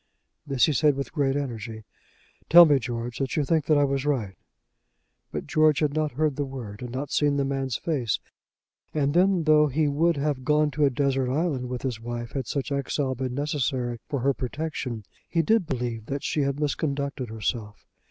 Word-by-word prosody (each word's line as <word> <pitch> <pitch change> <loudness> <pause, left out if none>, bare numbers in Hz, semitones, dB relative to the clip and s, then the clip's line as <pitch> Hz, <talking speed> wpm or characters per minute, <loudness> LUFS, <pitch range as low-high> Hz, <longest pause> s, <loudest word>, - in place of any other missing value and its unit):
This 135 -3 +3
he 155 - +1
said 145 +2 +3
with 140 0 -4
great 140 -3 +1
energy. 115 -5 -4 0.7
"Tell 170 +2 +10
me, 145 -3 +4
George, 120 0 -4
that 135 -2 -2
you 150 - +2
think 155 +1 +1
that 155 - +4
I 145 - +4
was 135 -1 0
right." 120 -10 -1 1.0
But - - -4
George 155 -2 +3
had 150 -2 +1
not 155 -2 -1
heard 150 0 0
the 145 - 0
word, 125 -6 -7
had 125 - -5
not 130 +3 -4
seen 145 -1 +2
the 140 - +1
man's 135 -3 -2
face. 135 -10 -1 0.8
And 145 -2 +1
then, 180 0 +3
though 150 -1 +5
he 150 +2 +1
would 160 +3 +2
have 140 -2 -1
gone 150 +2 +2
to 145 +2 +2
a - - +4
desert 135 -1 0
island 140 -4 -1
with 125 -1 -4
his 125 -5 -3
wife, 120 -1 -5
had 135 -4 -4
such 140 +1 -3
exile 140 -1 -1
been 130 0 -4
necessary 130 -4 -1
for 140 -4 -2
her 140 +2 +2
protection, 130 -4 -4 0.3
he 165 -1 +1
did 220 0 +2
believe 120 -5 -3
that 140 0 -3
she 150 - 0
had 140 -1 0
misconducted 140 -3 -2
herself. 110 -1 -4
140 Hz, 195 wpm, -26 LUFS, 125-150 Hz, 1.0 s, Tell